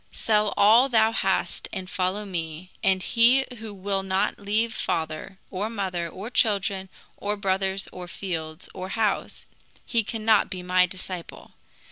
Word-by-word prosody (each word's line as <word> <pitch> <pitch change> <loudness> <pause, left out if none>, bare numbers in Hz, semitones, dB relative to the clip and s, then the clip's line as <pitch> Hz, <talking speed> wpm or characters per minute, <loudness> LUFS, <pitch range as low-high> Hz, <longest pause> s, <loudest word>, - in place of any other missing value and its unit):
Sell 210 -2 +2
all 230 +6 +6
thou 220 -2 +4
hast 195 -4 -1
and 185 -1 -5
follow 190 +2 -1
me; 170 -1 -5
and 190 -1 +3
he 250 +3 +5
who 220 -1 -7
will 195 0 -2
not 190 0 0
leave 215 +3 0
father, 160 +3 -3
or 200 +3 -2
mother, 185 -6 -2
or 200 +8 -7
children, 195 -4 +1 0.3
or 205 +1 -1
brothers, 195 -1 0
or 180 -1 -8
fields, 165 -3 -5
or 185 0 -6
house, 215 0 -1 0.4
he 230 -2 +1
cannot 220 0 +2
be 185 -2 -5
my 180 0 +4
disciple. 185 -1 -7
195 Hz, 145 wpm, -26 LUFS, 185-215 Hz, 0.4 s, all